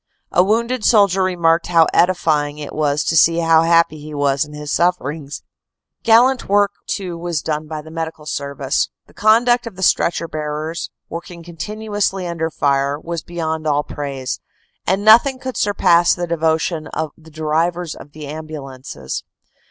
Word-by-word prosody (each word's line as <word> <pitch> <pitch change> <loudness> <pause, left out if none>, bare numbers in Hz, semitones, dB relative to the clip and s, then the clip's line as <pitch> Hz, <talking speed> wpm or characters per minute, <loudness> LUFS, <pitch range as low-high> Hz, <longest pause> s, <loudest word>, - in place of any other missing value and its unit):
A 180 - +4
wounded 235 +4 0
soldier 200 -5 +4
remarked 170 -3 +2
how 165 -2 +5
edifying 155 -5 +2
it 150 -1 -7
was 150 -1 0
to 160 - 0
see 165 +1 +5
how 165 -1 +4
happy 165 -2 +3
he 150 0 -9
was 140 -1 +1
in 150 - -10
his 150 0 -5
sufferings. 155 -4 -1 0.6
Gallant 245 +2 +4
work 205 0 +3 0.2
too 185 -3 -3
was 170 -4 -3
done 155 0 -2
by 155 -1 -6
the 160 - -12
Medical 160 -1 -5
Service. 140 -1 -2 0.2
The - - -22
conduct 240 +3 +3
of 220 - -8
the 190 - -5
stretcher 170 -1 +2
bearers, 155 +1 -4 0.2
working 170 +1 -8
continuously 195 +3 -3
under 165 -2 -2
fire, 140 -1 0
was 170 0 -5
beyond 160 -2 -4
all 145 0 +2
praise, 140 -4 -5 0.5
and 195 +2 +1
nothing 235 +5 +6
could 260 -1 -6
surpass 175 -4 +3
the 175 - -3
devo 160 -1 +1
tion 160 -2 -3
of 160 -2 -3
the 160 0 -17
drivers 160 +2 -1
of 145 - -13
the 155 -1 -8
ambulances. 140 - -7
165 Hz, 160 wpm, -19 LUFS, 150-180 Hz, 0.6 s, nothing